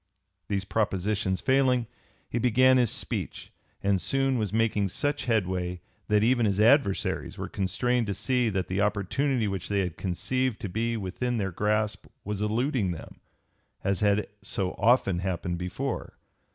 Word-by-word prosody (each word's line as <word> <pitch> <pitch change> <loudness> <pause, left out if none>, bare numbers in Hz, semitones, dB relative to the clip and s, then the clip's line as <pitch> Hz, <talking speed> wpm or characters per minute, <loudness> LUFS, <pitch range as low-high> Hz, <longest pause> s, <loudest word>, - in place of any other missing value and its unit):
These 100 -2 -1
propositions 100 -2 0
failing, 130 -2 +3 0.4
he 120 - -2
began 130 +2 +5
his 120 -3 +3
speech - - -4 0.3
and 100 -2 +2
soon 135 -2 +1
was 105 -4 -1
making 110 -2 +1
such 145 +9 -1
headway 90 -6 0 0.3
that 105 0 +3
even 120 -1 +3
his 100 0 0
adversaries 115 -2 +2
were - - -4
constrained 120 +5 0
to 100 - -2
see 125 +3 +1
that 95 -3 -1
the 95 +2 -1
opportunity 105 +5 +1
which 95 -2 -4
they 100 -1 +2
had 90 -4 -3
conceived 125 +6 -1
to 100 - -3
be 115 +5 -1
within 115 +5 -2
their 95 -3 -1
grasp 105 +3 0 0.2
was 105 0 -3
eluding 115 0 0
them, 85 -3 -7 0.6
as 100 -1 0
had 105 0 +2 0.2
so 95 -2 -2
often 105 -5 +3
happened 90 -1 -2
before. 115 +10 -4
105 Hz, 150 wpm, -27 LUFS, 95-125 Hz, 0.6 s, began